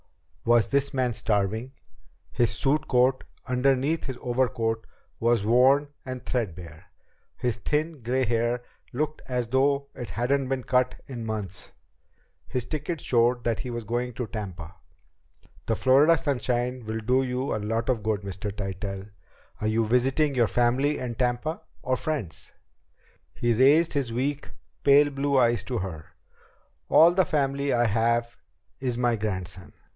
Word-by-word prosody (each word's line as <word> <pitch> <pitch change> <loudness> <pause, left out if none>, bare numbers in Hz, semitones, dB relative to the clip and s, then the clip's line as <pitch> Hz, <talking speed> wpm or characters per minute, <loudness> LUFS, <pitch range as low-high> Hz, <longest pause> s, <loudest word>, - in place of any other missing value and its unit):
Was 120 -3 +4
this 140 0 +1
man 125 -2 +1
starving? 110 +4 -1 0.6
His 120 -2 +2
suit 145 +2 0
coat, 130 0 +3 0.2
underneath 135 +4 +1
his 130 -2 -5
overcoat, 120 -3 -1 0.3
was 115 -3 +2
worn 130 +5 +4
and 130 -1 -7
threadbare. 90 -7 -4 0.5
His 120 -3 -1
thin, 150 +6 -2
gray 125 +3 0
hair 120 +1 0 0.3
looked 150 +4 -2
as 125 -3 -2
though 140 +2 +2
it 120 - -7
hadn't 130 +4 0
been 135 -1 -1
cut 125 0 +1
in 120 -4 -6
months. 100 -4 -4 0.8
His 125 -2 -2
ticket 155 +4 -3
showed 120 -1 +2
that 115 -2 0
he 125 - -5
was 120 -1 -4
going 120 +3 -2
to 125 +2 -3
Tampa. 95 -6 -7 0.9
"The 115 - +1
Florida 140 +8 +5
sunshine 125 -3 -1
will 110 +1 -3
do 125 +4 +2
you 130 0 -2
a 110 - -3
lot 115 +2 -1
of 125 -4 +1
good, 105 -1 -1
Mr. 100 +1 -5
Tytell. 95 0 -5 0.5
Are 105 - 0
you 110 +1 +2
visiting 130 +6 +2
your 120 -3 +3
family 125 +6 +2
in 125 -2 -4
Tampa, 125 +7 -1 0.2
or 130 0 +1
friends?" 125 - -4 0.8
He 120 0 +1
raised 145 +8 +4
his 135 -5 -1
weak, 140 +4 -2 0.3
pale 145 +1 +6
blue 140 0 0
eyes 120 -4 +3
to 125 - -2
hers. 85 -6 -5 0.8
"All 165 +2 +7
the 185 +1 +3
family 140 -2 0
I 120 0 +3
have 115 +2 +1 0.4
is 125 -3 -2
my 120 -1 +2
grandson. 95 -4 -4
125 Hz, 150 wpm, -26 LUFS, 110-135 Hz, 0.9 s, All